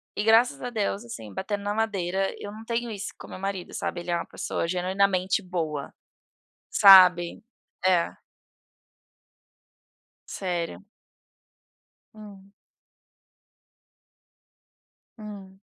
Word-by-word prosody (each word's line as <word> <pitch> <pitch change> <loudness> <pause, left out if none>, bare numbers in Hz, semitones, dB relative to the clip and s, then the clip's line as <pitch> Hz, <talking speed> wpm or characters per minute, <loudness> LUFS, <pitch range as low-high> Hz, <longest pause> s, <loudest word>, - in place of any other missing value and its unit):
e 205 - -1
graças 225 +3 +4
a 245 - -3
Deus, 215 -1 -2
assim, 110 - -9
batendo 200 - -4
na 205 0 -1
madeira, 195 -3 -1
eu 205 - -7
não 220 +1 -11
tenho 235 0 -2
isso 205 -1 -6
com - - -11
o - - -15
meu - - -8
marido, 195 -2 -4
sabe, 175 - -3
ele 175 0 -5
é - - +2
uma 170 - -3
pessoa 165 - -3
genuinamente 185 +2 +1
boa, 160 -6 -4 0.8
sabe. 180 -3 +7 0.4
É. 180 -2 +3 2.2
Sério. 175 0 -4 1.3
Hum. 200 -2 -13 2.7
Hum. 200 -3 -10
195 Hz, 105 wpm, -26 LUFS, 180-210 Hz, 2.7 s, sabe